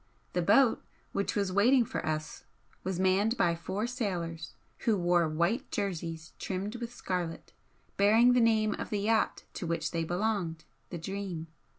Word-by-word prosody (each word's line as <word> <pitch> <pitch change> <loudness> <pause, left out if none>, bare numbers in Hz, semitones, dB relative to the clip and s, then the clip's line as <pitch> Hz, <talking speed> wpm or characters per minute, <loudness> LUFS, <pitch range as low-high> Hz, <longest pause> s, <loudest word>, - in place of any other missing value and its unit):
The 180 - +1
boat 225 +7 +4 0.3
which 200 - -1
was 200 -2 0
waiting 235 +6 +5
for - - -4
us 155 0 -3 0.4
was 185 -1 -2
manned 195 +5 +2
by 170 - +3
four 190 +6 -3
sailors 180 -10 -3 0.2
who 220 -3 +2
wore 175 -2 +3
white 170 +9 0
jerseys 170 -4 -3
trimmed 200 +5 -3
with 235 -1 -5
scarlet, 180 -7 -4 0.4
bearing 225 +5 +6
the 250 - +4
name 220 -2 +3
of - - -4
the 205 -2 -1
yacht 220 +1 +1
to 175 - -4
which 165 -1 -1
they 165 -1 -1
belonged 175 -2 -1 0.3
the 175 - -5
'Dream.' 185 -1 -4
190 Hz, 160 wpm, -30 LUFS, 170-220 Hz, 0.4 s, bearing